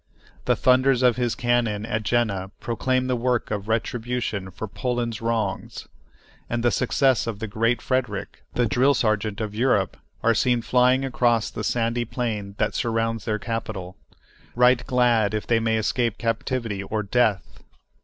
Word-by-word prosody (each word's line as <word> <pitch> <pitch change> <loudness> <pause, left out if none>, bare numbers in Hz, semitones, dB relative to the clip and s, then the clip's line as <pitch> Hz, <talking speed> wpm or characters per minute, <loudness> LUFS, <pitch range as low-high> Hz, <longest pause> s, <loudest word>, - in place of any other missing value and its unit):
The - - +3
thunders 130 0 +3
of 125 -2 +4
his 120 -2 0
cannon 120 -4 0
at 110 -1 -2
Jena 105 -4 0
proclaim 130 +2 0
the 130 -1 0
work 120 -1 0
of 105 -1 -3
retribution 115 -3 -2
for 100 +4 -6
Poland's 120 0 -3
wrongs; 115 -4 -2 0.6
and 120 0 -1
the 120 - +3
success 130 0 +2
of 115 -3 -3
the 110 - -4
Great 115 +3 0
Frederick, 125 -6 -2
the 120 - +2
drill 130 +5 +3
sergeant 110 -2 0
of 105 -2 -3
Europe, 105 -4 +1 0.3
are 115 - +4
seen 120 0 +1
flying 125 +2 +3
across 120 -3 +1
the - - -5
sandy 115 0 0
plain 110 -4 -4
that 110 - 0
surrounds 115 -1 -1
their 105 -1 0
capital, 105 -5 -5 0.6
right 125 0 +4
glad 120 -4 +2
if 105 - -3
they 115 -1 +2
may 115 0 +1
escape 115 +1 0
captivity 115 -2 -2
or 105 +2 -3
death. 105 -1 0
115 Hz, 155 wpm, -24 LUFS, 110-125 Hz, 0.6 s, of